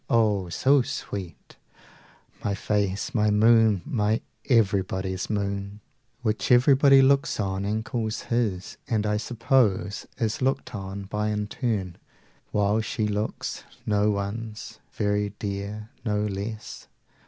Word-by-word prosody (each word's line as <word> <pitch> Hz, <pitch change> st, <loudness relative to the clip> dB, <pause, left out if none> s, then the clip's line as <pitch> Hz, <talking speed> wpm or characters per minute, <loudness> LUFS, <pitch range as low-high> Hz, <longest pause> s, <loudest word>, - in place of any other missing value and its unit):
oh, 105 Hz, -6 st, +2 dB
so 135 Hz, +10 st, +4 dB
sweet 100 Hz, -6 st, -6 dB, 0.9 s
My 100 Hz, -1 st, 0 dB
face, 100 Hz, +3 st, -1 dB
my 105 Hz, -3 st, +3 dB
moon, 110 Hz, -2 st, +4 dB
my 110 Hz, -1 st, 0 dB, 0.3 s
everybody's 95 Hz, -5 st, +1 dB
moon, 100 Hz, 0 st, -2 dB, 0.4 s
Which 110 Hz, +1 st, 0 dB
everybody 135 Hz, +2 st, +6 dB
looks 140 Hz, -1 st, +3 dB
on 95 Hz, -1 st, -1 dB
and 110 Hz, +2 st, -1 dB
calls 110 Hz, -2 st, -2 dB
his, 110 Hz, -6 st, -2 dB
30 115 Hz, -, 0 dB
And, 105 Hz, -1 st, +1 dB
I 105 Hz, 0 st, +1 dB
suppose, 110 Hz, -4 st, +1 dB
is 110 Hz, +1 st, -1 dB
looked 135 Hz, +1 st, 0 dB
on 100 Hz, 0 st, -5 dB
by 105 Hz, +2 st, -2 dB
in 105 Hz, 0 st, -1 dB
turn, 105 Hz, -6 st, -3 dB, 0.5 s
While 105 Hz, +1 st, +2 dB
she 110 Hz, 0 st, -2 dB
looks 105 Hz, +1 st, -3 dB, 0.2 s
no 105 Hz, 0 st, +2 dB
one's: 105 Hz, +2 st, -4 dB
very 105 Hz, -1 st, 0 dB
dear, 105 Hz, +2 st, -5 dB
no 105 Hz, -3 st, 0 dB
less. 105 Hz, +2 st, -5 dB
105 Hz, 125 wpm, -26 LUFS, 100-115 Hz, 0.9 s, everybody